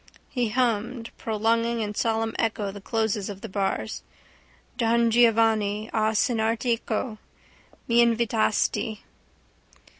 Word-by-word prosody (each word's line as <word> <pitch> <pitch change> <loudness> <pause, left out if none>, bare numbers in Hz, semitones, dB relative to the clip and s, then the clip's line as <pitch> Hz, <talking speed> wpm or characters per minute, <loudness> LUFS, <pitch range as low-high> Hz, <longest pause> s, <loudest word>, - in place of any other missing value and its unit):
He 245 -4 -1
hummed, 235 0 -1
prolonging 230 +1 0
in 210 -1 -3
solemn 225 +1 0
echo 215 -3 -1
the 200 0 -10
closes 220 -1 -1
of 200 -1 -8
the - - -6
bars: 195 -1 -2 0.7
Don 235 -1 +2
Giovanni, 220 -2 +3
a 220 0 +1
cenar 225 0 +2
teco 230 -1 -2 0.7
M'invitasti. 230 -2 +2
225 Hz, 100 wpm, -25 LUFS, 215-235 Hz, 0.7 s, Giovanni